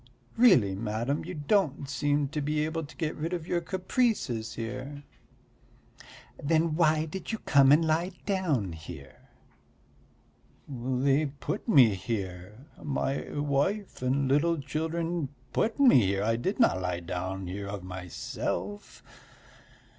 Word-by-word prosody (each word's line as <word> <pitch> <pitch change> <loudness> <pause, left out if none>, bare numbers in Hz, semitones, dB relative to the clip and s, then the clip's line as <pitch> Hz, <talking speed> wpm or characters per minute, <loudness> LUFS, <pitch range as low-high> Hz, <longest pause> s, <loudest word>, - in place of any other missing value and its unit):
Really, 180 - +5
madam, 115 +7 -2
you 180 +1 -6
don't 150 -2 +1
seem 145 0 0
able 155 +2 -1
to 145 - -11
get 160 -3 -2
rid 165 +3 -3
of 170 -3 -3
your 175 -1 0
caprices 185 - -1
here." 130 +5 -6 1.4
"Then 160 +2 +2
why 155 -2 +3
did 190 +7 -6
you 220 - -2
come 140 -2 +6
and 160 +3 +5
lie 165 +4 0
down 160 - 0
here?" 80 -4 -11 1.4
"They 135 +3 +1
put 140 - -5
me 130 - +6
here, 95 +3 -5 0.2
my 140 -1 -2
wife 145 +8 -1
and 135 +2 +1
little 155 +5 +2
children 160 +2 -2 0.2
put 225 +5 0
me 245 - +7
here, 100 +1 0
I 115 +2 +2
did 185 - -2
not 95 - +4
lie 90 -1 -2
down 90 +2 -4
here 100 +3 -5
of 100 -2 -6
myself. 90 +2 -5
140 Hz, 125 wpm, -28 LUFS, 110-165 Hz, 1.4 s, me